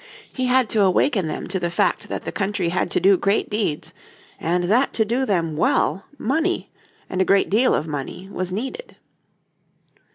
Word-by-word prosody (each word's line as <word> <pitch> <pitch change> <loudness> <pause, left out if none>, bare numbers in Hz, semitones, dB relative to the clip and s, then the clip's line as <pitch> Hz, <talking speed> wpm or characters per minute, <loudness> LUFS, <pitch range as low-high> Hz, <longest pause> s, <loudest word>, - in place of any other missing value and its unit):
He 255 -1 -1
had 255 -1 +3
to 215 - +2
awaken 195 - +2
them 155 - -4
to 190 - -1
the 175 -1 -1
fact 175 - 0
that - - -4
the - - -3
country 195 -3 -1
had 180 +2 -1
to - - +1
do 195 0 +5
great 200 +2 +1
deeds, 205 -8 -2 0.5
and 175 +2 0
that 225 +9 +2
to 220 - +1
do 250 +5 0
them 165 -6 0
well 170 +4 +1
money, 320 +9 -1 0.4
and 185 - -1
a - - +6
great 195 +1 +2
deal 240 +5 +4
of - - -1
money, 155 +5 -6
was 185 -1 -3
needed. 265 - -5
195 Hz, 185 wpm, -22 LUFS, 180-240 Hz, 0.5 s, a